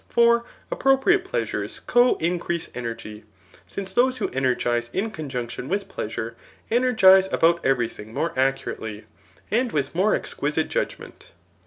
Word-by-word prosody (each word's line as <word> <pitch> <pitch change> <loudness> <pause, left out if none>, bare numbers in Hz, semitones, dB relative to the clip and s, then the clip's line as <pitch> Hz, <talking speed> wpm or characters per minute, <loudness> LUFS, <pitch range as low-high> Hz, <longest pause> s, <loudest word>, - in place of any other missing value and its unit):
For 235 0 +4 0.3
appropriate 270 +8 +3
pleasures 380 - -3
co 245 +1 +3
increase 170 0 -2
energy; 115 -3 -6 0.4
since 190 - -5
those 255 +4 +3
who 225 - -1
energize 120 -2 0
in 215 +3 -1
conjunction 130 - -5
with 200 +2 -1
pleasure, 110 +2 -5 0.4
ei^i^tze 195 -6 +5
about 170 +1 +3
every 125 -3 +2
thing 110 -1 -11
more 165 +8 -2
accurately, 120 -5 -2 0.5
and 240 +2 +1
with 140 -2 -1
more 190 +5 +3
exqui - - -3
site - - 0
judgment. - - -5
170 Hz, 135 wpm, -24 LUFS, -, 0.5 s, ei^i^tze